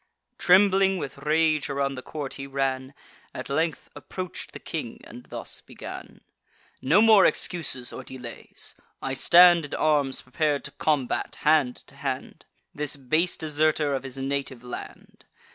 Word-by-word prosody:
Trembling 195 +1 +5
with 140 -5 -6
rage, 155 0 +2
around 140 0 -1
the 130 - -6
court 145 0 -6
he 135 0 -7
ran, 135 0 -2 0.4
At - - -6
length 160 +4 -1
approach'd 185 -1 -7
the - - -8
king, - - -5
and - - -12
thus - - -7
began: - - -10 0.6
"No 165 +11 +5
more 220 -3 +7
excuses 140 -8 +1
or - - -7
delays: 125 -3 -7 0.3
I 135 - -3
stand 175 +4 +7
In 145 - -5
arms 145 -4 +1
prepar'd 145 +2 0
to - - -5
combat, 145 -5 -1
hand 150 -5 +3
to - - -15
hand, 135 -2 -5 0.3
This 150 -1 -2
base 155 +6 +1
deserter 155 -1 +1
of 135 - -1
his 135 0 -8
native 135 -2 -3
land. 125 - -9
145 Hz, 145 wpm, -26 LUFS, 135-160 Hz, 0.6 s, more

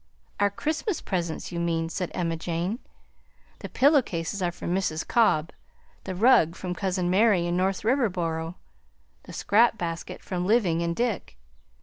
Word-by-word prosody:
"Our 205 0 +4
Christmas 315 - -2
presents, 170 -4 -3
you 170 - -3
mean," 165 -1 0
said 180 +1 -3
Emma 165 -2 -1
Jane. 175 +7 -3 0.8
"The - - -7
pillow 285 +1 +5
cases 175 -1 -4
are 175 -1 +1
from 175 0 -4
Mrs. 170 -4 -1
Cobb, 165 -9 +3 0.5
the 190 - -4
rug 185 -6 +4
from 180 -1 -4
cousin 185 -1 -1
Mary 190 -1 +3
in 175 0 -1
North 190 +2 0
Riverboro, 180 - 0 0.7
the - - -10
scrap 225 +2 +3
basket 170 -4 -5
from 180 -2 -3
Living 195 -7 +2
and 170 0 -1
Dick. 230 - -2
180 Hz, 150 wpm, -26 LUFS, 170-215 Hz, 0.8 s, pillow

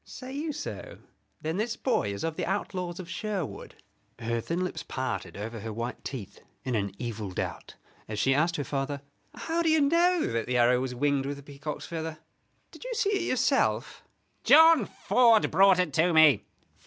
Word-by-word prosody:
"Say 260 0 -9
you 305 +3 -3
so? 295 0 -7 0.5
Then 160 +3 -2
this 225 +2 -1
boy 235 - 0
is 100 - -5
of 165 -1 -2
the - - -3
outlaws 180 -2 -3
of 185 - -7
Sherwood?" 200 -5 -5 0.4
Her 115 0 -2
thin 170 +8 -2
lips 180 - -4
parted 130 -9 -4
over 110 +2 -5
her 110 +2 -6
white 115 +3 -5
teeth 120 -8 -7 0.2
in 130 - -2
an 100 -3 -1
evil 110 -4 -5
doubt, 90 - -5 0.3
as 105 - -5
she 135 +6 +3
asked 165 +5 +2
her 145 - -2
father: 140 +1 -3 0.3
"How 335 +1 -2
do 330 - +2
you 315 0 +4
know 335 +4 +3
that 115 -1 -2
the 125 0 0
arrow 120 +1 +4
was 130 -1 -3
winged 140 +1 +1
with 140 0 -4
a 140 - -12
peacock's 145 +1 -7
feather? 160 -2 -5 0.5
Did - - -12
you - - -4
see 405 - +1
it 390 -4 0
yourself?" 260 +2 +1 0.4
"John 325 0 +7
Ford 230 -3 +3
brought 195 +2 +6
it 180 -5 0
to 165 +4 +3
me." 155 -9 +6
155 Hz, 190 wpm, -28 LUFS, -, 0.5 s, John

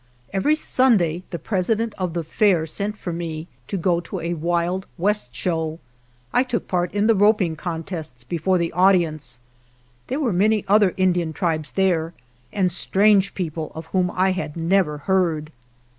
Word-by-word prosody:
Every 285 +11 +2
Sunday 210 - +3
the 170 - -4
President 215 +6 -1
of 180 -3 -3
the 170 - -1
Fair 180 -1 +2
sent 200 +6 -4
for 175 - -5
me 165 -1 -5 0.2
to 195 - -3
go 175 -1 +1
to 175 +2 -6
a 170 +1 -2
wild 175 +3 -1
west 205 -3 0
show. 160 +4 -2 0.6
I - - +4
took 255 -3 -2
part 180 -1 0
in 205 +1 +1
the 225 - +5
roping 205 -5 +3
contests 160 -6 -5
before 170 +7 0
the 170 -1 -1
audience. 170 -8 +2 0.7
There 265 - -2
were 250 -9 0
many 210 +3 +2
other 200 -2 +4
Indian 175 -3 +1
tribes 160 -3 -2
there, 175 -4 +1 0.4
and 185 -3 +1
strange 200 +2 +3
people 160 -4 -4
of 160 0 -7
whom 185 -1 +2
I 190 +1 +3
had 185 -4 -4
never 165 -2 +1
heard. 160 -2 0
180 Hz, 160 wpm, -22 LUFS, 165-195 Hz, 0.7 s, the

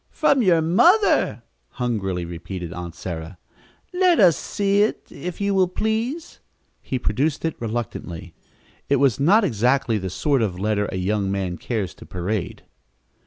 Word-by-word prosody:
"From 285 -4 +2
your 175 -7 +4
mother!" 345 - +3 0.3
hungrily 95 -8 -2
repeated 85 0 -6
Aunt 85 -1 -7
Sarah. 85 0 -6 0.6
"Let 360 -2 +3
us 175 -5 +6
see 200 0 0
it, 215 - 0
if 180 -1 -6
you 200 0 0
will, 190 -1 +3
please." 225 - -3 0.4
He 130 - -3
produced 145 +5 -1
it 160 - 0
reluctantly. 110 -7 -5 0.6
It 140 - +4
was 135 -3 +2
not 195 +11 +5
exactly 120 - +1
the 95 -1 -4
sort 135 - 0
of 95 -5 -1
letter 105 0 0
a - - -3
young 100 +1 0
man 95 -3 -2
cares 110 -6 -3
to - - -14
parade. 90 -1 -3
120 Hz, 150 wpm, -22 LUFS, -, 0.6 s, us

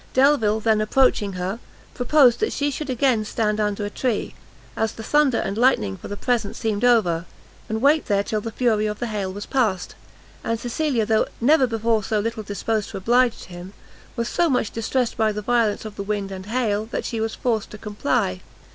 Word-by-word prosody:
Delvile 260 -6 +4
then 220 -1 +2
approaching 215 -3 +2
her, 185 +4 -3 0.3
proposed 250 -1 +4
that 435 - 0
she 290 0 -1
should 290 0 -5
again 250 -3 +2
stand 215 0 -1
under 210 -1 -1
a - - -3
tree, 240 -3 -2 0.4
as 220 -1 -1
the 225 - -9
thunder 295 -2 +3
and 200 +3 -2
lightning 235 - +3
for - - -10
the 205 - -6
present 225 -3 -1
seemed 220 -1 -2
over, 185 -9 +3 0.4
and 220 +2 -2
wait 295 +2 +4
there 200 -1 +2
till 215 +1 -2
the 225 - -5
fury 220 -3 +1
of 210 0 -3
the 240 - -3
hail 205 -4 -3
was 205 +2 -7
past; 215 -9 0 0.5
and 230 0 -1
Cecilia, 245 -1 -1
though 220 0 +2
never 265 +2 +4
before 225 -1 0
so 215 +2 0
little 225 +1 -2
disposed 210 +1 -2
to - - -6
oblige 240 +4 +2
him, 180 +2 -10 0.4
was 235 0 -2
so 345 +5 +1
much 250 -6 0
distressed 235 +2 -1
by 220 -1 +2
the 210 0 -5
violence 230 -2 +1
of 215 -1 -8
the - - -3
wind 200 -1 -3
and 190 0 -7
hail, 215 -3 0
that 235 - -4
she 225 -2 -3
was 225 0 -2
forced 225 -4 -1
to 215 - -9
comply. 175 - -1
220 Hz, 200 wpm, -23 LUFS, 205-245 Hz, 0.5 s, Delvile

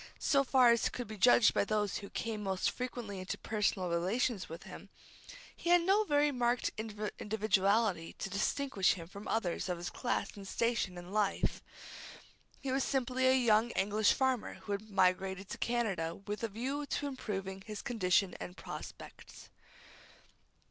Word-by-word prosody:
So 275 -1 +3
far 255 -2 +5
as 235 - +2
could 245 -2 -6
be 215 - -7
judged 235 +1 +6
by - - +2
those 210 -1 0
who 200 - -8
came 220 -2 -3
most 190 -2 0
frequently 245 -6 -5
into 185 +1 -4
personal 205 -4 0
relations 190 +5 0
with 165 +1 -8
him, - - -11 0.7
he 340 - -4
had 350 -1 +6
no 400 +4 +3
very 290 -3 +3
marked 245 -1 +1 0.5
individuality 210 -3 +1
to - - -5
distinguish 210 +1 +1
him 165 -3 -8
from 200 +4 -10
others 190 -4 -1
of 180 - -1
his 175 +1 -5
class 245 -5 -2
and 200 -1 -9
station 230 -5 0
in 175 +1 -9
life. 205 -1 0 1.0
He 270 - -3
was 265 0 +1
simply 260 -1 +1
a 260 - +6
young 230 -2 +4
English 205 +2 +3
farmer 260 -3 0
who 205 - -9
had 205 +2 -3
migrated 190 0 +1
to - - -6
Canada 195 -9 -1
with 205 +1 -6
a - - +1
view 265 +7 -3
to 290 - -2
improving 195 -8 -4
his 210 +1 -7
condition 195 -7 +2
and 180 - -7
prospects. - - -9
215 Hz, 160 wpm, -33 LUFS, 195-245 Hz, 1.0 s, judged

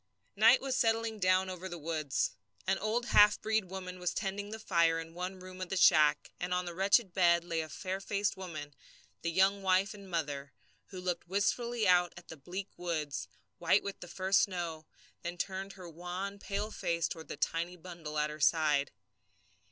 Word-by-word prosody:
Night - - +6
was 270 -1 -1
settling 225 -2 +1
down 185 0 +3
over 185 0 -6
the 175 - -6
woods. 155 -3 -1 0.3
An - - +1
old 225 +3 0
half 210 -2 +6
breed 220 -2 +1
woman 185 0 -7
was 180 -1 -2
tending 200 0 -3
the 220 - -5
fire 170 -6 +2
in 165 0 -7
the - - -18
one 180 +2 -5
room 185 0 -10
of 185 - -4
the 195 - -1
shack, 155 -4 +5
and 180 0 -1
on 180 0 -1
the 175 - -5
wretched 195 +2 +3
bed 170 -2 +4
lay 165 -2 -1
a 155 - -7
fair 190 +3 -4
faced 200 +1 0
woman, 155 -6 -7 0.5
the 170 - -1
young 190 +3 +3
wife 190 +1 +2
and 200 -2 -12
mother, 140 -4 -3 0.3
who 185 - -8
looked 180 -1 -3
wistfully 220 +4 0
out 180 -1 +4
at 175 - -13
the - - -7
bleak 180 +7 -6
woods, 160 -5 -3 0.3
white 170 +4 +3
with 200 - -5
the 180 - -9
first 190 +2 +2
snow, 170 -4 -3 0.3
then 175 +1 -5
turned 195 +2 -4
her 185 -2 -10
wan, 180 +4 -5
pale 205 +2 -3
face 170 -4 -1
toward 160 -1 -7
the - - -6
tiny 170 +2 -1
bundle 170 -3 -7
at 150 0 +1
her 150 - -8
side. 150 -2 +3
180 Hz, 195 wpm, -32 LUFS, 165-195 Hz, 0.5 s, Night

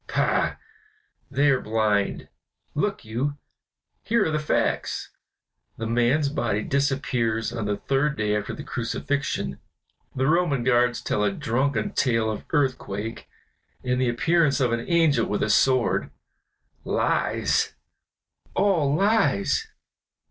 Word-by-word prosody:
Pah! - - +1 0.7
they 145 0 +3
are 130 - +1
blind. 105 -2 0 0.5
Look 195 - -2
you! 130 +7 -2 0.6
here 230 -2 +1
are 160 - 0
the 155 - 0
facts. 150 - -1 0.7
The 115 - -4
man's 120 +6 +2
body 120 -7 -1
disappears 125 -5 0
on 115 -3 -3
the 105 0 -1
third 145 +2 0
day 105 -1 0
after 105 - -3
the 150 - -8
crucifixion, 120 - -3 0.6
the 130 - 0
Roman 155 -4 +2
guards 120 -1 +2
tell 105 - 0
a 105 - +2
drunken 120 +3 -1
tale 115 -4 +1
of 105 - -6
earthquake 130 -7 -2 0.5
and 125 0 0
the 125 - +2
appearance 150 +4 +2
of 125 -3 +2
an 115 0 -1
angel 160 -8 +3
with 105 - -1
a 105 - +1
sword; 125 +3 +2 0.7
lies, - - 0 0.8
all 170 -8 +2
lies! 205 - +2
130 Hz, 125 wpm, -25 LUFS, 115-150 Hz, 0.8 s, they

